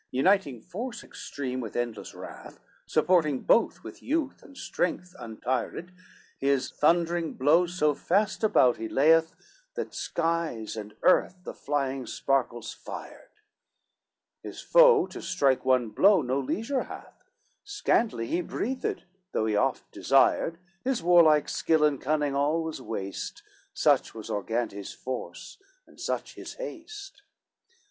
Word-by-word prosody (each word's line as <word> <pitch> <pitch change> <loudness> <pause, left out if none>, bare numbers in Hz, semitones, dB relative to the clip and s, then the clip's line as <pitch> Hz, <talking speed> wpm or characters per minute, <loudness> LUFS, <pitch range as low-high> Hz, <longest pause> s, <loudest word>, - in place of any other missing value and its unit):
XLVI 125 - -7
Uniting 145 - +2
force 235 - -6
extreme, 130 -2 -5
with 110 -4 -7
endless 120 -2 -4
wrath, - - -10 0.3
Supporting 155 -4 +2
both 230 - +2
with - - -10
youth 295 -1 -2
and 275 - -16
strength 180 -4 -3
untired, 125 +9 -4 0.5
His 140 -1 +1
thundering 170 +1 +1
blows 165 +6 +3
so 150 -3 +3
fast 205 +9 0
about 130 - +4
he 110 0 -5
layeth, 160 +3 +4 0.4
That - - -4
skies 165 -11 -2
and 105 -1 -8
earth 185 - +4
the - - -7
flying 135 -2 -2
sparkles 120 -4 -1
fired; - - -10 1.1
His - - -8
foe - - +6
to - - -9
strike 140 -8 +1
one 130 -3 +3
blow 190 - +4
no 130 +2 0
leisure 225 - -2
hath, - - -11 0.4
Scantly 235 - 0
he 170 +9 -1
breathed, 255 +8 -3 0.3
though 110 - +1
he 110 -1 0
oft 105 - 0
desired, 165 - +2 0.3
His 260 -7 -1
warlike 165 -4 +5
skill 160 -2 +1
and 145 -3 +2
cunning 150 0 0
all 150 +4 +1
was 160 -4 -5
waste, 100 -5 -5 0.3
Such - - +2
was 110 -2 -7
Argantes' 105 -1 -3
force, 125 -9 -7 0.3
and - - -20
such - - -3
his - - -9
haste. 415 -5 -9
150 Hz, 135 wpm, -27 LUFS, 125-185 Hz, 1.1 s, foe